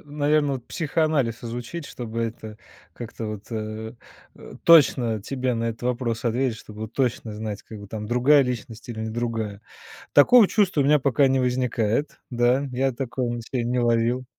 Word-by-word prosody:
наверное, 145 -1 0
психоанализ 145 -3 -1
изучить, 120 +8 -5
чтобы 115 -1 -5
это 110 -1 -6 0.4
как-то 115 -1 -7
вот, 105 -1 -6
э, 110 0 -5 0.4
э, - - -12
точно 130 -9 +5
тебе 130 +3 -2
на 115 0 -2
этот 115 0 -4
вопрос 120 -2 -2
ответить, 120 0 0
чтобы 110 0 -8
точно 120 -2 -2
знать, 105 -1 -5
как 110 - -10
бы 100 - -10
там 105 +1 -6
другая 130 +5 +4
личность 120 -2 -5
или 115 -2 -5
не 110 0 -3
другая. 110 -3 -3 0.5
Такого 215 +9 +7
чувства 190 -9 +2
у - - +3
меня 150 +1 +5
пока 140 +1 +3
не 135 0 +2
возникает. 125 +1 0
Да, 125 +3 +2
я 130 +2 0
такого 125 0 -3
на 120 - -4
себе 120 +1 -3
не 125 +1 0
ловил. 120 +1 +1
120 Hz, 165 wpm, -24 LUFS, 110-135 Hz, 0.5 s, Такого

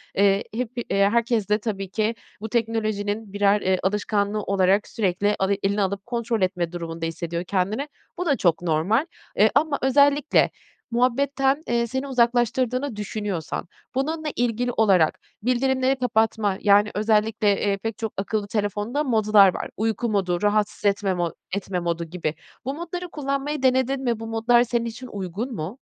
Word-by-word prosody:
Eee, 195 +1 +3
hep 240 0 -3
iii, 240 - -2 0.2
herkes 230 -1 +1
de 210 +1 +3
tabii 195 -3 -4
ki 220 +3 0 0.3
bu 220 - -5
teknolojinin 215 -2 -1
birer, 205 0 +3
eee, 185 0 +1
alışkanlığı 205 +1 0
olarak 195 +1 +2
sürekli 205 0 0
avi 195 +1 +1
eline 200 +1 +1
alıp 195 0 -2
kontrol 235 -2 -2
etme 180 -2 0
durumunda 165 -1 -5
hissediyor 170 +1 -3
kendini. 200 +9 -1 0.3
Bu 360 - -2
da 285 -5 +2
çok 170 -2 +2
normal, 175 - +1 0.3
eee, - - +6
ama 305 -2 +2
özellikle 285 +2 +4 0.4
muhabbetten, 270 +4 +1
eee, 235 0 +1
seni 265 +4 -3
uzaklaştırdığını 245 +1 +1
düşünüyorsan 205 -6 -4 0.3
bununla 310 +4 -1
ilgili 245 +1 0
olarak 190 -9 +3 0.2
bildirimleri 260 +2 +2
kapatma, 220 -4 +1
yani, 205 +1 +4
özellikle, 215 -1 +2
eee, 200 -1 +1
pek 225 +1 -4
çok 225 -2 -4
akıllı 200 +1 -2
telefonda 210 +6 -1
modlar 215 -6 +5
var. - - -5
Uyku 225 +2 -1
modu, 185 -4 0
rahatsız 210 0 0
etme 200 -1 +2
mo 175 -2 -1 0.2
etme 195 -2 -2
modu 170 -1 -2
gibi. 165 -2 -3 0.3
Bu 270 - -2
modları 345 +3 -5
kullanmayı 275 -1 -3
denedin 260 +1 +2
mi? 235 -3 0
Bu 225 - -6
modlar 230 +2 +3
senin 235 -1 -1
için 235 +3 -7
uygun 205 +4 -5
mu? 185 - -5
215 Hz, 155 wpm, -24 LUFS, 195-245 Hz, 0.4 s, eee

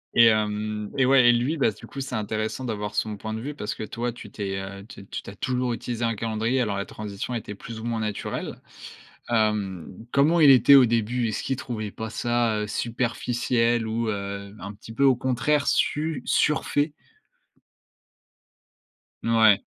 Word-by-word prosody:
Et 115 - +8
hem 105 -1 0
et, 135 -2 +3
ouais 130 -3 +6
et - - +9
lui, 130 +7 0
bah 130 - +3
du - - -13
coup, 140 - -8
c'est 130 -2 -5
intéressant 110 +4 -2
d'avoir 105 -2 -3
son 105 -2 -1
point 110 +1 -5
de 110 - -4
vue, 145 +3 -5
parce 105 -5 -4
que - - -9
toi, 120 +2 -3
tu 120 - -11
t'es, 95 -2 -4
heu, 100 +1 -8
tu 100 -3 -12
tu - - -6
as 100 - -10
toujours 125 +1 -1
utilisé 120 0 -3
un 115 - +1
calendrier, 115 +4 0
alors 100 -4 -1
la 100 - -2
transition 105 +3 -6
était, 105 -3 -5
plus 115 +2 -8
ou - - -8
moins, 115 -1 -2
naturelle. 105 -2 -4 0.7
Hem, 105 -6 0 0.3
comment 155 +5 +4
il 145 -3 +8
était 135 +2 +8
au 130 -2 +7
début? 115 +1 0
Est-ce 110 - -3
qu'il 135 - -1
trouvait 110 -5 -5
pas 110 +1 -6
ça, 120 -1 0
heu, 105 - -2
superficiel 120 0 0
ou, 115 +1 -1
heu, 100 0 -4
un 100 +3 -7
petit 110 +2 -12
peu 140 - +2
au 135 - +6
contraire 130 +4 +1
su 150 -3 +1
surfait? 150 0 +1 2.3
Ouais. 110 -3 +5
115 Hz, 180 wpm, -25 LUFS, 105-125 Hz, 2.3 s, et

